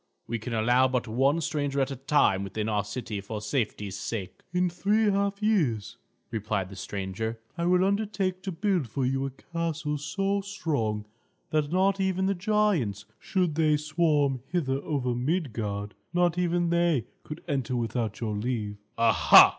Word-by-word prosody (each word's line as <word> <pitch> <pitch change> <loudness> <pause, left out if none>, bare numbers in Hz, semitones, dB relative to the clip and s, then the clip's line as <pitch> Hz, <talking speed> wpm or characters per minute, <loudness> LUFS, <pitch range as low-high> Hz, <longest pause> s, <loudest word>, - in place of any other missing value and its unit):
We 115 0 -3
can 115 +1 -4
allow 120 +4 +4
but 125 -1 -1
one 135 +8 +2
stranger 145 -4 -1
at 135 0 +1
a - - -3
time 130 -7 +2
within 105 +2 -3
our 105 -2 +1
city, 105 -1 -5
for 105 +2 -5
safety's 105 -3 -2
sake." 95 -2 -5
"In 180 +1 +2
three 205 +5 +2
half 200 +1 0
years," 150 - +1 0.3
replied 105 -4 -1
the 100 - -9
stranger, 100 +4 -4 0.2
"I 170 0 -1
will 180 +1 +4
undertake 195 -2 0
to 190 - -4
build 180 - 0
for 130 +4 -1
you 135 +1 0
a - - -3
castle 160 +1 -3
so 195 +7 0
strong 145 - -2 0.5
that 150 -1 +1
not 190 +2 +3
even 190 -1 +1
the 195 - +2
giants, 180 - +1
should 180 -4 0
they 155 -1 +3
swarm 150 -4 +1
hither 145 -7 0
over 130 -5 -1
Midgard 115 - -2 0.2
not 175 -1 +3
even 175 -1 +1
they 170 -8 +2 0.2
could 150 +2 -8
enter 135 -3 -1
without 115 -2 -2
your 110 -2 -1
leave." 105 -2 -2 0.2
"Aha!" 115 -4 +8
140 Hz, 160 wpm, -28 LUFS, 110-175 Hz, 0.5 s, Aha